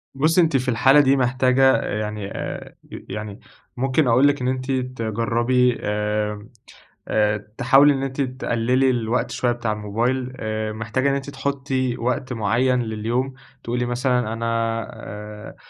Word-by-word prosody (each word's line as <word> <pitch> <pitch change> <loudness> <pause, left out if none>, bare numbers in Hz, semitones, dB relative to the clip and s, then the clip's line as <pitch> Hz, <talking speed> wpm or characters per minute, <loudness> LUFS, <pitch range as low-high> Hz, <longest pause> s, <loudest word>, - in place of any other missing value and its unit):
بُصّي 160 +6 +3
أنتِ 160 -5 +3
في 130 0 -2
الحالة 135 +4 +5
دي 140 -1 +4
محتاجة، 130 +1 +3
يعني 105 -1 -3
آآ - - -6 0.3
يعني 105 -1 -6 0.4
ممكن 135 +3 +1
أقول 125 +4 +5
لِك 145 -2 +1
إن 125 - -1
أنتِ 130 +1 -2
تجرّبي 125 0 0
آآ 105 0 -2 0.6
آآ 105 -1 0
تحاولي 135 +3 +5
إن 135 - -3
أنتِ 135 +1 -3
تقلّلي 130 0 +1
الوقت 120 -1 0
شوية 125 - 0
بتاع 120 -2 -2
الموبايل، 120 +5 -2
آآ 110 -1 -3
محتاجة 115 +5 -1
إن 140 - +1
أنتِ 140 0 -4
تحطي 135 -2 -2
وقت 125 +2 -2
معيّن 125 +3 +1
لليوم، 115 +4 -2 0.3
تقولي 120 +1 -1
مثلًا 125 -2 0
أنا 115 0 -4 0.5
آآ 105 +1 -9
125 Hz, 140 wpm, -22 LUFS, 110-130 Hz, 0.6 s, الحالة